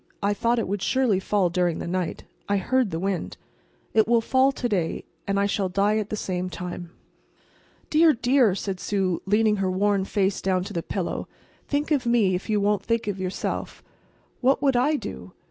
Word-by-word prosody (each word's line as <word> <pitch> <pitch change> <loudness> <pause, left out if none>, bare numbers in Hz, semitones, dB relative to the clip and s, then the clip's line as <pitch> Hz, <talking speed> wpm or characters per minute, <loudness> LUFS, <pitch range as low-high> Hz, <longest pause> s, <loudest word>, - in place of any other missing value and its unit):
"I 200 +1 +2
thought 235 +4 +1
it 230 - -1
would 200 +1 -2
surely 250 -7 +2
fall 190 -2 +1
during 175 -1 +1
the - - -5
night. 180 -1 -3 0.3
I 200 - +3
heard 255 +4 +1
the 160 - -3
wind. 190 +1 -3 0.6
It 220 -2 +4
will 235 0 +4
fall 260 +4 +3
to 250 -2 -2
day, 185 -7 -1 0.2
and 200 0 +1
I 200 - +2
shall 200 -1 0
die 200 +3 +2
at 210 -1 -4
the - - -2
same 185 -3 -3
time." 175 0 -6 1.0
"Dear, 320 +1 +6
dear!" 245 -4 +3
said 195 -2 -4
Sue, 190 -4 -1
leaning 210 +1 +3
her 195 -1 0
worn 195 +1 +1
face 195 -1 0
down 185 -1 +1
to 205 +2 -7
the 170 - -1
pillow, 185 +1 -3 0.4
"think 290 +2 -1
of 265 -5 +1
me, 225 -6 +3
if 180 +5 -3
you 210 -1 +2
won't 205 0 +1
think 230 0 -1
of 200 -2 -2
yourself. 185 0 -4 0.6
What 265 +2 +3
would 275 -3 +2
I 275 +6 +3
do?" - - -7
200 Hz, 195 wpm, -25 LUFS, 185-235 Hz, 1.0 s, Dear